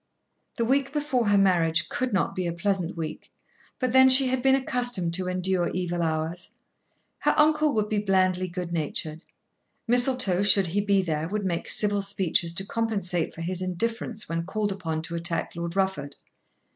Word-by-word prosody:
The 230 - -1
week 275 +2 +1
before 290 -6 -1
her 205 0 +4
marriage 175 -5 +2
could 255 -1 -3
not 195 0 0
be 185 -2 -3
a 170 - -2
pleasant 185 -1 -2
week, 160 -1 -6 0.5
but 255 -2 -2
then 260 0 +7
she 260 0 +6
had 260 0 -1
been 265 +1 +4
accustomed 245 -9 0
to 185 +1 -1
endure 185 -1 0
evil 175 -1 -2
hours. 160 +2 -3 0.7
Her - - +1
uncle 305 0 +3
would 210 -1 0
be 210 -1 -1
blandly 185 -2 +1
good 175 -1 -6
natured. 155 0 -3 0.7
Mistletoe, 245 -6 +3
should 200 -1 +4
he 185 +4 -1
be 200 -1 +2
there, 160 -2 -2
would 205 +2 -3
make 170 -2 -2
civil 205 -1 +2
speeches 175 -3 0
to 190 +2 -1
compensate 200 -7 -2
for 165 - -8
his 180 +2 -3
indifference 225 +4 -3
when 165 0 -2
called 210 +1 -2
upon 165 -5 -4
to 170 - -5
attack 170 0 -2
Lord 170 +1 -4
Rufford. 190 -8 -1
190 Hz, 175 wpm, -25 LUFS, 170-225 Hz, 0.7 s, then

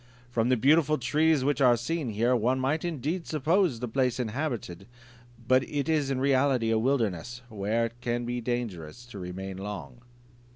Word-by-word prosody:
From 120 0 +1
the 130 - +3
beautiful 155 +4 +4
trees 150 +3 +2
which 145 +1 +1
are 125 -2 +6
seen 145 +3 -2
here, 115 +4 +2
one 125 +3 +1
might 140 +4 0
indeed 165 +1 -3
suppose 160 - +1
the 125 - -2
place 125 +1 0
inhabited; 115 - -3 0.6
but 130 +1 +5
it 145 -2 -2
is 155 -4 +1
in 135 -2 -1
reality 130 -3 +2
a 110 - +3
wilderness, 120 -2 -1
where 110 +2 0
it 115 - -5
is 120 0 -2
dangerous 115 -4 -4
to 120 -5 -10
remain 95 +1 -6
long." 105 +4 -7
125 Hz, 165 wpm, -28 LUFS, 115-140 Hz, 0.6 s, are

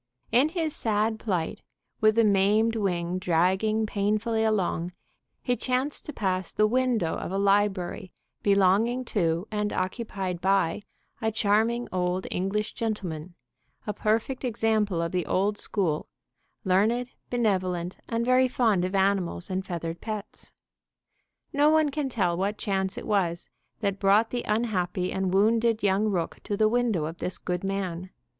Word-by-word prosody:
In 255 +6 +4
his 320 -2 -2
sad 220 0 0
plight, 180 -7 -2 0.4
with 215 0 +4
the 230 - +5
maimed 210 +2 +3
wing 180 -4 -1
dragging 190 +6 +2
painfully 215 +2 0
along, 180 -5 0 0.5
he 245 - +1
chanced 255 +4 -2
to - - -3
pass 185 - -2
the 215 - +2
window 235 -6 +1
of - - -5
a 195 - -1
library 195 -2 +1 0.3
belonging 200 +6 +3
to 170 -4 0
and 210 -1 -1
occupied 185 -2 -3
by 195 -1 +2 0.4
a 220 0 +1
charming 225 +3 +1
old 180 0 -1
English 200 +4 -1
gentleman, 180 -7 -4 0.5
a 210 - -2
perfect 225 +6 -1
example 220 -7 +1
of 165 - -2
the 180 -2 -1
old 205 +2 +1
school, 170 -7 -1 0.6
learned, 220 +7 +2 0.2
benevolent, 185 -7 -1
and 230 0 0
very 255 +1 +4
fond 225 -7 +2
of 185 +2 -2
animals 190 -2 +1
and 190 +1 -2
feathered 170 -1 -4
pets. 215 -2 -7 1.0
No 290 +1 +4
one 310 -1 +4
can 280 -1 -2
tell 185 -8 0
what 200 +4 -1
chance 190 -2 -1
it - - -6
was 180 -5 0 0.3
that 200 -2 -1
brought 205 +3 +4
the 245 - -1
unhappy 195 -5 0
and 190 -1 -1
wounded 225 +3 +2
young 200 +2 +2
rook 180 -5 -1
to 205 - -2
the 215 - +4
window 225 -8 +1
of 165 +2 -6
this 180 - -3
good 180 0 -3
man. 190 -2 -3
205 Hz, 150 wpm, -27 LUFS, 185-225 Hz, 1.0 s, the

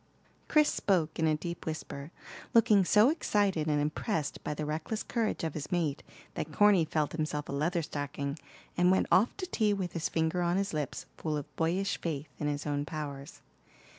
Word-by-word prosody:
Chris 300 -1 +5
spoke 170 -6 +1
in 160 - +3
a 155 -1 +2
deep 170 +2 -6
whisper, 150 -2 -5 0.5
looking 210 -3 +6
so 210 +6 +5
excited 200 - +1
and 150 -1 +2
impressed 150 +1 -2
by - - -2
the 150 0 -3
reckless 155 +8 -3
courage 225 -6 -1
of 160 -2 -1
his 150 -1 -6
mate 160 -5 0 0.3
that 155 - -4
Corny 200 +1 +5
felt 155 -1 0
himself 155 -2 -2
a - - -5
Leatherstocking, 145 -2 -2 0.4
and 180 0 +4
went 190 - +4
off 210 +6 +4
to 380 - -3
tea 215 - +1
with 185 -3 -3
his 165 - -1
finger 160 +2 0
on 175 +1 +1
his 195 -2 -1
lips, 150 -2 -3
full 155 -2 -2
of 145 - -8
boyish 180 +4 0
faith 150 -3 -3
in 150 - -1
his 145 0 -2
own 145 -1 -1
powers. 145 -3 -6
160 Hz, 185 wpm, -31 LUFS, 150-190 Hz, 0.5 s, looking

